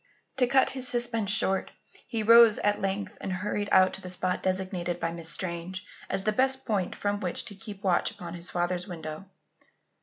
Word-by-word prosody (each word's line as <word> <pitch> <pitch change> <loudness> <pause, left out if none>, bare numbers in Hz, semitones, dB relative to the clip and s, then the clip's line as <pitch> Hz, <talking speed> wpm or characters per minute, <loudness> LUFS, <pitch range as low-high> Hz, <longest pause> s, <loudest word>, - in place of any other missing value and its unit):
To 250 -2 +3
cut 265 +2 +3
his 260 -1 -2
suspense 240 -4 0
short, 195 -2 +2 0.4
he 225 -2 -2
rose 230 0 +7
at 205 0 0
length 195 +1 -3
and 190 - -4
hurried 205 +2 -2
out 185 0 +5
to 195 - -5
the 185 - -7
spot 180 0 +1
designated 185 -2 -2
by 165 - -1
Miss 165 -1 -5
Strange 185 +2 -2 0.2
as 195 0 -2
the 215 - +2
best 265 +3 +2
point 200 -6 -1
from 205 0 -2
which 180 -3 -3
to 225 - -7
keep 205 0 -10
watch 180 -3 +2
upon 170 -2 -9
his 175 0 -2
father's 175 +1 -2
window. 160 -1 -7
195 Hz, 190 wpm, -28 LUFS, 180-215 Hz, 0.4 s, rose